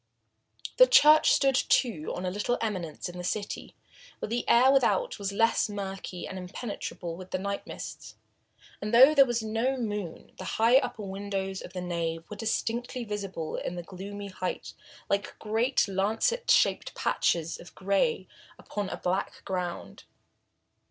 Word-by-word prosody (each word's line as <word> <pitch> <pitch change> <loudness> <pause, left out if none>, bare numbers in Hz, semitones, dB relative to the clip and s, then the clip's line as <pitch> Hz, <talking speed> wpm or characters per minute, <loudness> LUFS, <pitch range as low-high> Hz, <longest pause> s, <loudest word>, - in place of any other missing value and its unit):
The - - +9
church 310 -5 +7
stood, 270 -1 +4
too, 230 - +1
on 180 - -4
a 180 - -1
little 210 +5 -1
eminence 185 -8 -3
in 175 0 -8
the - - -5
city, 205 +3 -4 0.4
where - - -5
the 240 +2 -2
air 255 +3 +6
without 275 - +2
was 200 -1 -2
less 225 +2 +2
murky 195 -3 -5
and 190 - -6
impenetrable 180 -3 -6
with 185 +1 -10
the - - -1
night 200 +1 -4
mists, - - -8 0.7
and 210 +3 -1
though 265 +5 +9
there 275 -3 +6
was 235 -2 -1
no 225 +5 0
moon 210 -7 -4
the - - -5
high 230 +3 +6
upper 245 -5 -1
windows 195 -1 -4
of 185 - -10
the 180 - -4
nave 165 -2 -3
were - - -4
distinctly 235 +3 -2
visible 195 -7 -4
in 175 - -4
the 175 - -5
gloomy 200 +3 -7
height 185 -1 -4 0.3
like 200 +1 -1
great 225 +5 +1
lancet 220 - 0
shaped - - +3
patches 165 -1 0
of 175 - -13
gray 200 - +1 0.3
upon 205 -2 -4
a - - -4
black 185 +2 -2
ground. 180 -2 -4
205 Hz, 160 wpm, -28 LUFS, 185-235 Hz, 0.7 s, The